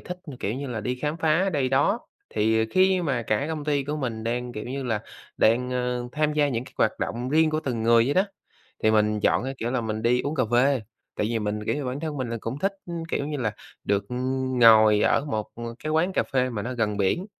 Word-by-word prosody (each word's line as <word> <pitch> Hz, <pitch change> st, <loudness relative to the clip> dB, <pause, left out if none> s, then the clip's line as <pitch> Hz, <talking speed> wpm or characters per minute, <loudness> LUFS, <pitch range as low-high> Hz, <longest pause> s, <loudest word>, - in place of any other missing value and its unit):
thích, 180 Hz, 0 st, -7 dB, 0.2 s
kiểu 105 Hz, -, -1 dB
như 140 Hz, +2 st, -4 dB
là, 120 Hz, -4 st, -4 dB
đi 125 Hz, +5 st, -2 dB
khám 150 Hz, +5 st, -3 dB
phá 165 Hz, +4 st, +2 dB
đây 140 Hz, -4 st, +1 dB
đó. 135 Hz, +2 st, +2 dB, 0.3 s
Thì, 110 Hz, +1 st, +2 dB
ờ, -, -, +2 dB
khi 185 Hz, -1 st, +3 dB
mà 135 Hz, -7 st, 0 dB
cả 110 Hz, +5 st, 0 dB
công 155 Hz, -2 st, -4 dB
ty 145 Hz, -2 st, 0 dB
của 150 Hz, +2 st, -3 dB
mình 115 Hz, -6 st, -3 dB
đang, 120 Hz, +1 st, -2 dB
kiểu 105 Hz, -2 st, -6 dB
như 135 Hz, +2 st, -4 dB
là, 110 Hz, -4 st, -1 dB, 0.3 s
đang, 125 Hz, +3 st, +3 dB
ơ, 125 Hz, -1 st, -2 dB
tham 150 Hz, 0 st, +1 dB
gia 150 Hz, -1 st, +2 dB
những 120 Hz, -2 st, -2 dB
cái -, -, -15 dB
hoạt -, -, +2 dB
động 120 Hz, +3 st, -3 dB
riêng 155 Hz, +3 st, +3 dB
của 155 Hz, 0 st, 0 dB
từng 120 Hz, -6 st, -3 dB
người 115 Hz, 0 st, +5 dB
vậy 140 Hz, +4 st, 0 dB
đó, 190 Hz, -, +4 dB, 0.6 s
thì 110 Hz, -, +4 dB
mình 105 Hz, -1 st, +2 dB
chọn 115 Hz, -, +2 dB
cái, 135 Hz, +1 st, -3 dB
kiểu 115 Hz, -, -2 dB
là, 130 Hz, -, 0 dB
mình 110 Hz, -1 st, -3 dB
đi 120 Hz, +2 st, +3 dB
uống 145 Hz, +3 st, -3 dB
cà 130 Hz, -5 st, +2 dB
phê, 130 Hz, +2 st, +4 dB, 0.4 s
tại 105 Hz, -, 0 dB
vì 115 Hz, -, 0 dB
mình, 105 Hz, 0 st, -3 dB
kiểu -, -, +1 dB
như, 145 Hz, -, -3 dB
bản 130 Hz, +2 st, -3 dB
thân 155 Hz, -2 st, -4 dB
mình 130 Hz, -3 st, -3 dB
là 115 Hz, -, -2 dB
cũng 115 Hz, +6 st, -4 dB
thích, 195 Hz, +5 st, 0 dB, 0.4 s
kiểu 140 Hz, -, -1 dB
như 150 Hz, -, -3 dB
là, 115 Hz, -6 st, -1 dB, 0.3 s
được 100 Hz, 0 st, +1 dB, 0.6 s
ngồi 110 Hz, -2 st, +7 dB
ở 140 Hz, -, +3 dB
một 110 Hz, -7 st, -3 dB, 0.4 s
cái 155 Hz, -, -1 dB
quán 175 Hz, +4 st, +2 dB
cà -, -, +2 dB
phê 130 Hz, -2 st, 0 dB
mà 105 Hz, -4 st, -3 dB
nó 125 Hz, +3 st, -4 dB
gần 110 Hz, -3 st, 0 dB
biển, 100 Hz, -, 0 dB
125 Hz, 250 wpm, -25 LUFS, 110-145 Hz, 0.6 s, ngồi